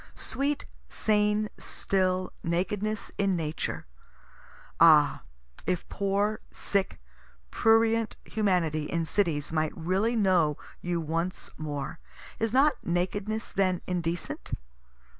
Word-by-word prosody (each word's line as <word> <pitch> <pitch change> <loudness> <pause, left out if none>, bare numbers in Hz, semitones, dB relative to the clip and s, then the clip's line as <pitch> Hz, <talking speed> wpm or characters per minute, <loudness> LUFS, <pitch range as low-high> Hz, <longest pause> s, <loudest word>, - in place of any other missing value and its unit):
Sweet, 280 +2 -1 0.2
sane, 210 0 +2
still 185 -1 0
Nakedness 200 +5 -1
in 195 -2 +2
Nature! 155 -2 -3 0.9
ah 155 -3 +6 0.5
if 180 -2 -1
poor, 200 +2 0
sick, 200 -1 -1 0.5
prurient 225 0 +3
humanity 180 -8 +1
in 165 +2 -1
cities 160 -5 0
might 155 -1 0
really 190 +8 +1
know 180 -8 +3 0.2
you 175 -1 -1
once 165 +3 -2
more! 150 0 -4 0.4
Is 225 -1 +1
not 275 +4 +3
nakedness 195 +5 -1
then 185 -2 +1
indecent? 175 -2 -3
185 Hz, 100 wpm, -28 LUFS, 165-210 Hz, 0.9 s, ah